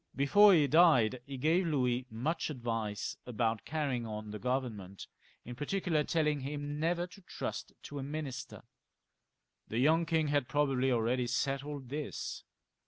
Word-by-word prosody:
Before 205 +10 +6
he 150 -3 +5
died 135 -6 +5
he 135 -1 -6
gave 165 +7 +2
Louis 125 -4 0
much 130 +12 -2
advice 115 -6 -3
about 115 -2 -1
carry 145 -4 -1
ing 120 -1 -5
on 105 -1 -6
the 105 - -6
Government, 115 -7 -3 0.4
in 125 - -6
particular, 155 +3 0
telling 150 -2 +1
him 145 +2 -4
never 170 +2 +1
to 190 +2 -15
trust - - -5
to 145 - -6
a - - -4
minister. 140 -2 -5 1.0
The 110 - -4
young 160 +6 +3
king 160 -2 +1
had 145 -3 +1
probably 135 -3 +1
already 120 +1 +1
settled 140 +1 -2
this. 145 +1 -5
140 Hz, 150 wpm, -32 LUFS, 120-155 Hz, 1.0 s, Before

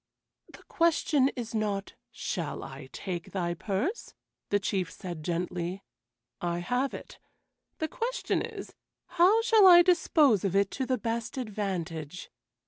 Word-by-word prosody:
"The - - -15
question 310 -5 +2
is 235 -3 -5
not, 205 -3 -2 0.2
'Shall 165 -5 -4
I 135 0 -9
take 175 -3 -6
thy 175 -3 -1
purse?'" 205 - -3 0.3
the 205 - +3
Chief 185 -3 -1
said 175 -4 -7
gently. 175 +2 -3 0.6
"I 175 -1 -1
have 245 +10 -1
it. - - -11 0.6
The 315 - -1
question - - -2
is, - - -7 0.3
'How 370 +6 +4
shall 445 -4 +6
I 350 -1 +9
dispose 310 - +4
of 195 -1 0
it 200 0 +3
to 260 -2 -3
the 255 0 +1
best 230 +3 -3
advantage?'" 185 - -4
205 Hz, 135 wpm, -29 LUFS, 175-290 Hz, 0.6 s, I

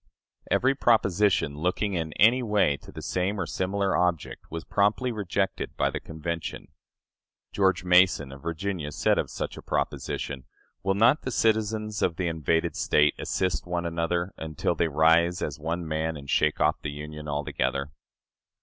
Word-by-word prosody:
" - - -67
Every 135 +2 +3
proposition 100 - +2
looking 90 +4 0
in 80 -3 -2
any 120 +5 +5
way 105 - +2
to - - -14
the - - -9
same 95 +3 -1
or - - 0
a - - -7
similar 95 +1 -1
object 90 -3 -1
was 80 0 -5
promptly 105 +5 +1
rejected 100 -3 -2
by - - +1
the - - -3
convention. 80 +1 -5 0.8
George 95 -3 +2
Mason, 90 -6 +4
of 70 0 -11
Virginia, 85 -1 -3
said - - +2
of - - -2
such - - -5
a - - -8
proposition: 65 -3 -3 0.4
"Will 95 +1 0
not 115 +9 +4
the - - -4
citizens 110 -2 0
of 85 - +1
the 90 - -2
invaded 80 0 0
State 75 0 +3
assist 90 -2 -1
one 85 -1 -2
another, 85 +2 -1
until 80 -2 -1
they 85 - +1
rise 80 +3 +3
as 75 -1 -4
one 85 +2 -3
man 80 0 -2
and 70 -1 -11
shake 75 0 +2
off - - +2
the 75 - -4
Union 75 +1 -7
altogether?" 70 -1 -2
85 Hz, 170 wpm, -27 LUFS, 75-100 Hz, 0.8 s, any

